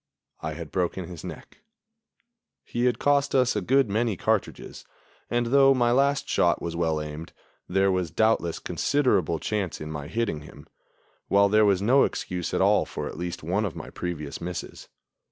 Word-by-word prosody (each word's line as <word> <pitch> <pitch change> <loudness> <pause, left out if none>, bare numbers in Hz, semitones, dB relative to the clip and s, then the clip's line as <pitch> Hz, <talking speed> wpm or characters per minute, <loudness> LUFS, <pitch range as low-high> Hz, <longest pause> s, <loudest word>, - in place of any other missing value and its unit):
I 80 0 -4
had 80 -2 -8
broken 90 0 -1
his 85 -3 -9
neck. 90 - -10 1.1
He 120 +1 -1
had 125 -2 +2
cost 140 0 +2
us 130 -2 +3
a 105 - 0
good 135 +6 +3
many 110 0 0
cartridges, - - -2 0.5
and, 120 0 +1
though 135 -1 +6
my 120 -2 +2
last 140 +3 +2
shot 85 -1 +2
was 85 -1 -5
well 80 -2 0
aimed, 75 +2 -7 0.4
there 95 +1 +2
was 90 -3 -1
doubtless 85 -2 +1
considerable 100 - +1
chance 95 +2 -3
in 75 0 -6
my 75 -2 -6
hitting 110 -8 -2
him, - - -13 0.6
while 100 0 +4
there 105 +1 +4
was 100 -1 +2
no 130 +6 +5
excuse 90 -2 -3
at - - 0
all - - +4
for - - -5
at - - -7
least 85 -2 -5
one 95 +7 0
of 100 -6 -3
my - - -8
previous 75 -5 -5
misses. 90 +1 -6
95 Hz, 175 wpm, -26 LUFS, 85-120 Hz, 1.1 s, though